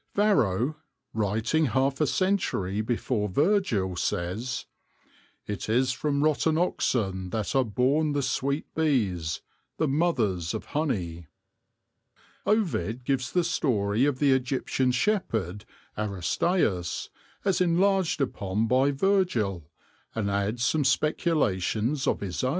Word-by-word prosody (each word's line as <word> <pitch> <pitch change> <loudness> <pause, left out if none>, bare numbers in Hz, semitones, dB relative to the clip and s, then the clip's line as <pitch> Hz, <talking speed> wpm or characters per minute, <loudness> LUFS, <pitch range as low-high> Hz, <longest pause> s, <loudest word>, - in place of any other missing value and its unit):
Varro, 150 - +2 0.4
writing 110 +9 +1
half 135 +3 +1
a 155 - +3
century 130 - 0
before 110 -1 -1
Virgil, 120 - +1
says, 100 +10 -2 0.4
" - - -32 0.3
it 105 +1 -5
is 130 +3 +3
from 145 +2 0
rotten 155 +1 +2
oxen 100 - 0
that 110 +6 -2
are 135 - +4
born 130 +7 +1
the 145 -1 0
sweet 140 +3 -1
bees, 100 - 0 0.4
the 155 - +1
mothers 120 - 0
of - - -5
honey/' 90 - -2 1.2
Ovid 130 - 0
gives 130 0 -1
the 180 - +2
story 115 -8 +1
of 145 -3 +1
the 140 0 +3
Egyptian 130 0 +1
shepherd 115 - -1 0.3
Aristaeus 100 - 0 0.4
as 195 -2 +2
enlarged 185 -1 +2
upon 105 -4 -1
by 130 +4 +3
Virgil, 135 - 0 0.5
and 105 -3 -1
adds 105 +4 0
some 155 +1 +2
speculations 135 - +1
of - - +1
his 95 +1 -3
own. 130 - +2
130 Hz, 120 wpm, -27 LUFS, 100-155 Hz, 1.2 s, are